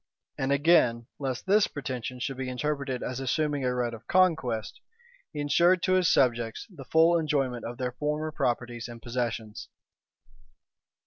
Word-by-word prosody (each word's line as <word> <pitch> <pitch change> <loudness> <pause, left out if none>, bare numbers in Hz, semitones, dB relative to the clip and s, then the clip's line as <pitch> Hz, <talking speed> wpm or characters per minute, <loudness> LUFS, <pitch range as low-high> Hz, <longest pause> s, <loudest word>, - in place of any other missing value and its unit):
And 135 +1 -1
again, 140 -6 +3
lest 130 -3 -3
this 205 +2 +4
pretension 130 -3 -5
should 135 +1 -3
be 130 -1 -3
interpreted 135 -1 -2
as 130 0 -4
assuming 145 +2 0
a 125 -1 0
right 120 -1 -1
of 115 0 -11
conquest, 160 - +1 0.5
he 150 - -6
insured 170 +5 +3
to 185 - +2
his 185 -2 +4
subjects 120 -3 +1
the 145 -7 -11
full 165 +5 +4
enjoyment 135 -6 -1
of 120 +1 -6
their 125 0 -2
former 150 +4 -2
properties 120 -3 -2
and 120 -1 -9
possessions. 115 -2 -4
130 Hz, 150 wpm, -28 LUFS, 120-155 Hz, 0.5 s, this